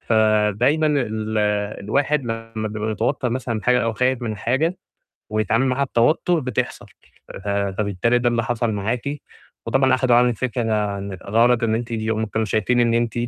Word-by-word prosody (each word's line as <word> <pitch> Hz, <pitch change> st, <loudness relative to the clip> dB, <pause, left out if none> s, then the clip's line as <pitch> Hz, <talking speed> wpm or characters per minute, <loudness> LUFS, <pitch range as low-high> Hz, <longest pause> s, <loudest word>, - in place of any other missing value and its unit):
فدايمًا 110 Hz, +7 st, +2 dB
ال 110 Hz, -7 st, -1 dB, 0.5 s
الواحد 140 Hz, +6 st, +1 dB
لمّا 115 Hz, -1 st, -5 dB, 0.2 s
بيتوتر 110 Hz, +4 st, -2 dB
مثلًا 120 Hz, -3 st, -2 dB
حاجة 125 Hz, 0 st, +3 dB
أو 115 Hz, -1 st, 0 dB
خايف 125 Hz, +2 st, 0 dB
من 110 Hz, -2 st, -3 dB
حاجة، 145 Hz, -, 0 dB, 0.5 s
ويتعامل 110 Hz, +4 st, +1 dB
معاها 130 Hz, +2 st, +1 dB
بتوتر 155 Hz, +7 st, +2 dB
بتحصل، 125 Hz, -5 st, -3 dB, 0.4 s
ف -, -, -11 dB
فبالتالي 100 Hz, +3 st, 0 dB
ده 120 Hz, 0 st, +2 dB
اللي 115 Hz, -1 st, 0 dB
حصل 120 Hz, -1 st, -1 dB
معاكِ 110 Hz, +4 st, -2 dB, 0.7 s
وطبعا 135 Hz, -1 st, +3 dB
أخدوا 125 Hz, -1 st, +3 dB
عنِّك 120 Hz, -2 st, +3 dB
فكرة 125 Hz, -1 st, -2 dB, 0.6 s
غلط 115 Hz, +3 st, +3 dB
إن 110 Hz, -1 st, +2 dB
أنتِ 120 Hz, +1 st, -4 dB
هم 110 Hz, 0 st, -1 dB
كانوا 110 Hz, +1 st, -2 dB
شايفين 110 Hz, +4 st, +1 dB
إن 115 Hz, -1 st, +3 dB
أنتِ 115 Hz, -1 st, 0 dB
115 Hz, 150 wpm, -21 LUFS, 110-125 Hz, 0.7 s, حاجة